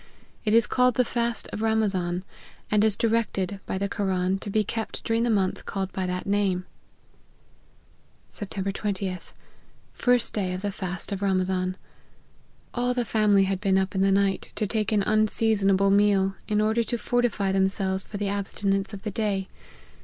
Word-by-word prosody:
It 215 0 +3
is 230 -1 +6
called 250 -2 +2
the 250 - +3
fast 235 0 -1
of 210 - -4
Ramazan, 195 -5 0 0.5
and 210 0 +4
is 220 -2 +6
directed 210 -4 0
by - - -2
the 200 +1 -1
Koran 190 -2 0
to 205 - -6
be 215 +1 +2
kept 220 +2 -4
during 225 0 +1
the 240 - +1
month 195 -4 0
called 195 -1 -3
by 185 -1 -2
that 180 0 -3
name. 200 -3 0 0.9
" - - -35
Sept. 200 -2 -5
20th. 195 -3 -4 0.6
First 245 -1 +3
day 190 -4 -1
of 185 +2 -5
the 205 - -1
fast 185 0 -3
of 200 -1 -3
Ramazan. 185 -1 0 1.0
All 245 0 0
the 245 -1 0
family 210 -2 +3
had 195 0 -1
been 195 -2 +2
up 190 0 0
in 190 - 0
the 195 0 +4
night, 195 -1 +1
to 215 - 0
take 215 +1 -1
an 210 -2 +2
unseasonable 205 -2 +2
meal, 200 -1 +3
in 210 0 +1
order 220 +2 +2
to 240 +1 -2
fortify 230 -4 0
themselves 190 0 +1
for 205 - -7
the 205 0 -2
abstinence 195 0 -1
of 195 - -8
the 215 - -3
day. 200 -2 -1
200 Hz, 175 wpm, -26 LUFS, 190-220 Hz, 1.0 s, is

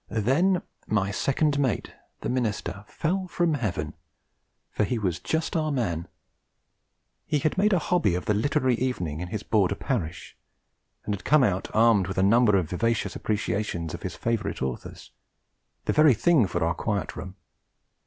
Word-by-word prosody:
Then 140 - +2 0.2
my 100 -2 +1
second 145 +7 +1
mate, 130 -8 -1 0.3
the - - -3
minister, 110 -5 -2
fell 185 +3 -2
from 175 -2 +1
Heaven 90 - -2 0.8
for - - 0
he 120 +4 0
was 95 -6 -1
just 160 +2 -2
our 155 -2 +1
man. 90 - -1 1.2
He 150 - +1
had 150 +2 0
made 210 +3 +3
a 190 - +4
hobby 170 - +1
of 90 - -3
the 105 - +2
literary 130 +4 +1
evening 90 - -2
in 90 - -4
his 105 +3 -4
Border 100 -3 +2
parish; 95 - -4 0.7
had 100 -2 -3
come 150 -2 +4
out 95 -5 +1
armed 110 -4 +4
with 95 - -5
a 95 - +3
number 105 0 +5
of 85 -5 -2
vivacious 115 +5 0
appreciations 100 -6 -2
of 85 - -6
his 90 -3 -5
favourite 115 - -2
authors, 65 -2 -6 0.7
the - - +1
very 150 -4 +6
thing 150 - +4
for 85 -1 -1
our 85 - +1
Quiet 100 -1 -2
Room. 95 +1 -7
110 Hz, 165 wpm, -26 LUFS, 95-145 Hz, 1.2 s, very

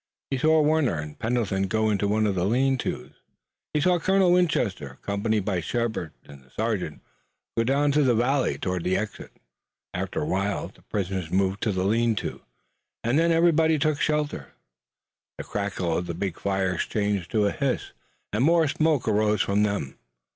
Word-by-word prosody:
He 135 - +1
saw 155 +1 +4
Warner 150 - +2
and 75 0 -7
Pendleton 110 -5 0
go 110 +2 +1
into 100 0 0
one 110 +1 +2
of 100 - +1
the 90 -2 -1
lean 135 +4 +2
tos, 130 - -2
and 60 - -14 0.6
he - - +3
saw 175 +3 +3
Colonel 190 +1 +3
Winchester, 115 - +1
accompanied 105 0 -1
by 95 -4 0
Shepard 110 -3 -2
and 70 -2 -13
the 65 - -25
sergeant, 100 - -3 0.5
go 115 - +2
down 140 +4 +2
the 140 -4 +3
valley 130 +4 +1
toward 90 -2 -2
the 95 +1 +1
exit. 105 +1 -5 0.6
After - - -2
a - - -2
while 100 +2 -1
the - - -22
prisoners 95 -4 -3
moved 95 +2 0
to 110 - +1
the 95 -1 -1
lean 115 +2 +2
tos, - - -4 0.6
and 120 +6 +2
then 165 +1 +3
everybody 165 -1 +4
took 155 0 0
shelter. 150 -1 -1 0.8
The - - -5
crackle 95 -5 -2
of 90 - -2
the 85 - -4
big 90 -1 -3
fires 95 -2 -1
changed 100 -4 -1
to 105 -2 +3
a 100 - +2
hiss, 140 -4 -2 0.4
and 110 +4 +2
more 165 +1 +4
smoke 155 -3 +1
arose 105 -1 +2
from 100 +1 +1
them. 100 -10 -1
110 Hz, 180 wpm, -25 LUFS, 95-140 Hz, 0.8 s, saw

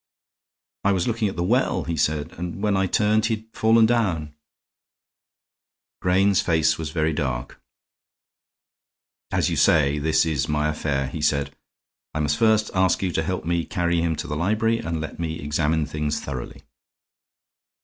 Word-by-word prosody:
"I 100 - +3
was 90 -2 0
looking 115 -2 0
at - - -7
the 85 - -1
well," 125 +8 +1
he 85 - -3
said, 75 +1 0
"and 90 +3 -6
when 105 -2 +2
I 95 0 +1
turned 110 +2 +2
he 110 - +1
had 110 0 -13
fallen 110 0 +4
down." 90 -11 0 1.7
Grayne's 95 +1 +3
face 80 -2 +2
was 80 -2 -3
very 80 0 0
dark. 65 -3 -4 1.7
"As - - +1
you - - 0
say, 75 -2 +3
this 80 +2 +2
is 75 -4 -1
my 75 +1 +1
affair," 75 -3 -1
he 70 +4 -6
said. 70 -2 0 0.6
"I - - -1
must 75 0 0
first 110 -1 +3
ask 95 0 +2
you 90 - 0
to 80 - 0
help 90 +1 -3
me 85 0 0
carry 85 -1 0
him 85 -1 0
to - - -5
the 75 - -3
library 110 +7 +1
and 80 -7 -3
let 80 +2 -6
me 80 -1 -3
examine 75 +1 0
things 75 0 -2
thoroughly." 65 -4 -7
80 Hz, 165 wpm, -23 LUFS, 75-100 Hz, 1.7 s, fallen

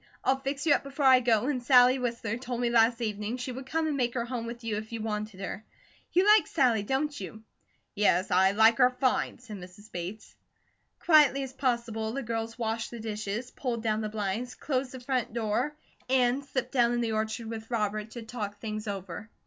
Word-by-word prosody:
"I'll 265 0 +2
fix 275 +2 -3
you 300 - +6
up - - +2
before 275 +1 -3
I 260 -1 +8
go; 235 -2 +2
and 270 -3 -1
Sally 250 +1 +6
Whistler 235 -3 -2
told 245 0 -5
me 240 -1 +1
last 230 +1 +4
evening 215 +1 -2
she 255 +1 -4
would 260 +1 -8
come 320 +3 0
and 305 -2 0
make 245 -2 0
her 235 -1 -1
home 240 -2 -4
with 235 +1 -7
you 220 -2 -2
if 215 +1 -7
you 230 - -4
wanted 215 -2 -4
her. 195 +1 -5 0.5
You 365 +2 +3
like 425 0 +6
Sally, 250 -8 +2
don't 275 +7 -1
you?" 220 +3 -8 0.5
"Yes, 200 -2 +2
I 190 +1 +5
like 220 +3 +5
her 250 -1 +7
fine," 255 0 0
said 225 -4 -9
Mrs. 185 +4 -13
Bates. 180 +5 -6 0.7
Quietly 295 -4 +5
as 265 -1 -7
possible 235 -4 -1
the 275 +1 -3
girls 225 0 -3
washed 225 -1 -2
the 235 - -8
dishes, 215 +2 -4
pulled 235 -4 -3
down 215 -1 0
the 215 - -3
blinds, 215 +3 -3
closed 265 -2 -2
the 260 - -8
front 250 -2 -2
door, 235 +6 -1 0.3
and 255 +1 +2
slipped 260 -2 -3
down 240 -3 +3
in 240 - 0
the 230 -1 -1
orchard 220 +1 -2
with 225 0 -7
Robert 215 -2 -1
to 235 - -7
talk 215 -3 -5
things 215 -1 -5
over. 195 0 -6
235 Hz, 210 wpm, -29 LUFS, 215-255 Hz, 0.7 s, I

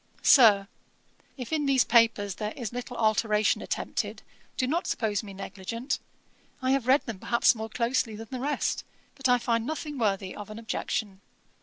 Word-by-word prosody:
'SIR, 210 -7 +7 0.7
'If 255 +3 -6
in 295 -2 +1
these 265 -2 +4
papers 225 -4 +3
there 210 0 -3
is 240 -4 -5
little 245 0 -6
alteration 215 -1 +2
attempted, - - -3 0.3
do 255 - +1
not 325 +7 -1
suppose 210 -3 0
me 210 -3 -10
negligent. 200 +6 -4 0.6
I 260 -1 0
have 270 -3 +1
read 270 +3 +4
them 225 -6 -6
perhaps 235 +6 +3
more 220 -1 -6
closely 235 -1 0
than 225 0 -9
the 255 - -4
rest; 290 +3 -1 0.3
but 270 -2 -1
I 250 - +6
find 230 -2 0
nothing 300 +1 -4
worthy 195 -4 -1
of 205 0 -8
an 215 - -8
objection. 215 -3 -3
230 Hz, 170 wpm, -27 LUFS, 210-255 Hz, 0.7 s, SIR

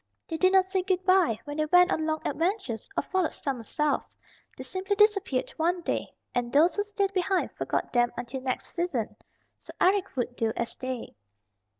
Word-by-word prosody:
They 325 - -3
did 370 +3 +4
not 380 -1 +6
say 380 0 0
good 370 0 -1
by 370 - +4
when 290 0 -6
they 310 - +1
went 360 +3 +6
on 315 0 -1
long 315 0 -2
adventures, 330 - -2
or - - +2
followed 375 -4 -1
summer 270 -5 -3
south. 295 +6 -1 0.5
They - - -6
simply 385 +2 -2
disappeared 400 -10 +2
one 345 +2 +1
day, - - -2 0.2
and 245 -1 -1
those 315 +6 +4
who 410 - +1
stayed 400 -1 -1
behind 375 0 0
forgot - - -3
them 240 -1 +3
until 245 +2 -5
next 255 -1 -3
season. 270 -12 -2 0.4
So - - -11
Eric 390 -1 +2
would 245 -1 -2
do 225 -2 0
as 235 - -2
they. 255 -2 -5
330 Hz, 190 wpm, -28 LUFS, 255-375 Hz, 0.5 s, not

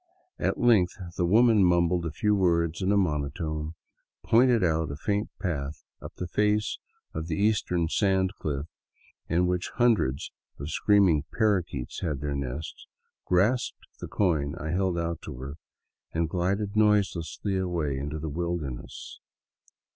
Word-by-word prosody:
At - - 0
length 110 -7 +4 0.2
the 85 - +1
woman 110 +1 +5
mumbled 85 -1 +3
a - - -4
few 105 +7 +1
words 85 -4 +1
in 95 +1 +1
a 100 - +4
monotone, 75 -2 -1 0.5
pointed 120 -2 +4
out 80 -2 +1
a 70 - -4
faint 100 +7 -1
path 75 -4 -3 0.2
up - - -9
the 90 - -4
face 105 +3 +1 0.3
of 80 +1 -4
the 80 - -1
eastern 100 -4 +1
sand 95 +1 +1
cliff, 70 -2 -2 0.6
in 85 +2 +2
which 90 0 -1
hundreds 95 - +2 0.3
of 70 +2 -5
scream 100 +3 +4
ing 75 -4 +2
parrakeets 95 - 0
had 75 -6 -2
their 75 0 -2
nests, 70 +2 -5 0.4
grasped 105 +8 +1
the - - -6
coin 80 -7 0
I 80 -2 -4
held 90 0 0
out 85 -1 -2
to - - -6
her, 70 +4 -7 0.5
and 80 0 0
glided 100 +5 -1
noiselessly 100 -2 +1
away 85 -6 -1
into 75 +2 -4
the 80 +1 -5
wilderness. 80 -5 -5
85 Hz, 145 wpm, -27 LUFS, 75-100 Hz, 0.6 s, woman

